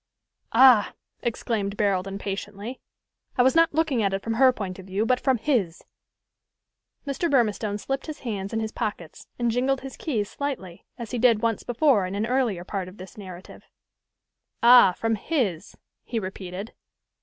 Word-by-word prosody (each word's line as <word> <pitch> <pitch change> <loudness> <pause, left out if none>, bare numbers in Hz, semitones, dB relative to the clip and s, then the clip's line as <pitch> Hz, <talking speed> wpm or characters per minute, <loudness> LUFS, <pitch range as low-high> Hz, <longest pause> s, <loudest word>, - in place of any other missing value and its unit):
"Ah!" 245 -3 +6 0.3
exclaimed 215 -4 -2
Barold 195 -3 +1
impatiently: 200 +4 -5 0.6
"I 245 - +5
was 260 - +4
not 330 0 +5
looking 310 -7 +1
at 195 -2 +1
it 195 - -5
from 230 - -2
her 260 +3 +5
point 195 -6 -6
of 190 - -11
view, 195 +3 -1
but 250 +2 +2
from 265 -2 +2
his." 215 - -1 1.2
Mr. 285 +5 -1
Burmistone 215 -6 +1
slipped 270 +8 -4
his 310 - -7
hands 200 -5 -4
in 225 - -1
his 220 -1 -3
pockets, 175 -8 -5
and 240 -1 +1
jingled 260 +3 0
his 265 -1 -8
keys 225 -10 -2
slightly, 230 -13 -6
as 235 -3 -7
he 245 - -2
did 230 -2 +4
once 230 -2 +1
before 245 -6 +2
in 190 - -5
an 210 +2 0
earlier 235 -7 0
part 190 0 -4
of 185 +3 -12
this 185 0 -11
narrative. 185 -3 -11 1.0
"Ah! 240 -6 +8
from 225 +4 -1
his," 215 - -2 0.3
he 235 - -4
repeated. 190 0 -6
220 Hz, 165 wpm, -25 LUFS, 195-255 Hz, 1.2 s, Ah